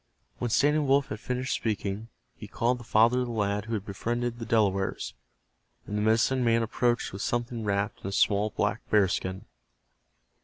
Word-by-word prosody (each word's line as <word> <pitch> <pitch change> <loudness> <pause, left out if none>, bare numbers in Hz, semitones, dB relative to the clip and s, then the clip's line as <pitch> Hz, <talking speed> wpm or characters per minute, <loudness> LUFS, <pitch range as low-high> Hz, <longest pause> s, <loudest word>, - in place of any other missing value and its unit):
"When 120 - -1
Standing 145 +5 +3
Wolf 135 +1 +3
had 105 - -5
finished 125 +3 -2
speaking 105 -1 -2 0.3
he 105 - -9
called 120 +3 0
the - - -10
father 115 +2 +4
of 125 - -1
the - - -4
lad 105 -2 -1
who 115 0 -2
had 100 -2 -4
befriended 120 +4 -3
the 115 - -6
Delawares, 100 -4 +1 0.7
and 105 - -5
the 105 - 0
medicine 115 +4 +2
man 115 -1 +3
approached 120 0 0
with 95 - -5
something 120 0 -2
wrapped 100 0 -1
in - - -5
a - - -3
small 100 +1 +2
black - - -1
bearskin. 95 -2 +1
115 Hz, 180 wpm, -28 LUFS, 105-120 Hz, 0.7 s, father